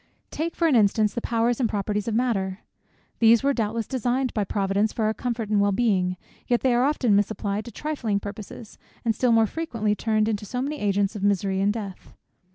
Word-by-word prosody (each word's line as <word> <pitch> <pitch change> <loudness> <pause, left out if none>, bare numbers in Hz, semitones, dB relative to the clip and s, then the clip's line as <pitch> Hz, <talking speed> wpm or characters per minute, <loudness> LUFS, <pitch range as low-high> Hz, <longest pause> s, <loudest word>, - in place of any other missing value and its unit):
Take 330 +2 -3
for 335 - +2
an 295 - +3
instance 210 -1 +3
the 235 - -3
powers 230 +1 0
and 240 -4 +1
properties 205 +1 -2
of 225 - -1
matter. 200 -6 -1 0.6
These 230 +1 +5
were 280 0 +3
doubtless 225 -1 -1
designed 255 +1 -1
by 210 - 0
Providence 200 +2 0
for 220 - -1
our 215 - +1
comfort 235 -3 -3
and 210 -1 +3
well 200 0 +3
being; 190 -4 +1 0.3
yet 240 -1 +2
they 260 -2 +2
are 240 +1 +3
often 260 -7 +2
misapplied 205 0 -1
to 235 - -8
trifling 240 -6 -2
purposes, 205 +2 -9 0.3
and 225 - +2
still 245 +2 +1
more 225 -1 +5
frequently 225 -6 -2
turned 215 0 0
into 215 -2 -1
so 250 +4 -4
many 290 +3 -3
agents 200 0 0
of 205 - -5
misery 195 -1 +1
and 200 +1 +3
death. 205 -4 -7
220 Hz, 205 wpm, -25 LUFS, 205-240 Hz, 0.6 s, These